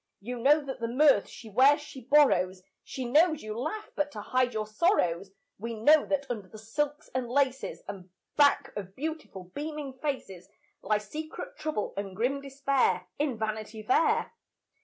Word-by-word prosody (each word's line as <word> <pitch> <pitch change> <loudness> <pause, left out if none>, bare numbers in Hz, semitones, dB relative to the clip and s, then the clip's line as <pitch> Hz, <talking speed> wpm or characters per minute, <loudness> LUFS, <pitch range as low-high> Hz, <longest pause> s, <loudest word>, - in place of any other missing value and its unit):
You 240 +5 -6
know 290 +4 +4
that 265 -1 -5
the 230 - -2
mirth 260 -2 +4
she 230 - -11
wears, 265 +8 +5
she 295 -3 -10
borrows; 195 -10 +3 0.2
She 260 - -5
knows 310 +5 +3
you 215 0 -5
laugh 310 - -4
but 295 0 -1
to 210 - -6
hide 255 +3 +1
your 215 -2 -2
sorrows; 210 - +1 0.3
We 230 +2 -4
know 295 +8 +5
that 285 -1 0
under 220 -6 -5
the 215 - -12
silks 290 +7 -3
and 255 -2 -2
laces, 270 0 0
And 190 -2 -8 0.3
back 285 -1 +4
of 195 -2 -6
beautiful, 280 - -6
beaming 295 -2 -5
faces, 195 - -4 0.3
Lie 210 +1 +1
secret 300 +10 -7
trouble 310 -9 -3
and 195 -2 -4
grim 255 +7 0
despair, 275 -1 +1
In 285 -5 0
Vanity 215 0 -4
Fair. 255 +8 +2
255 Hz, 165 wpm, -29 LUFS, 215-290 Hz, 0.3 s, wears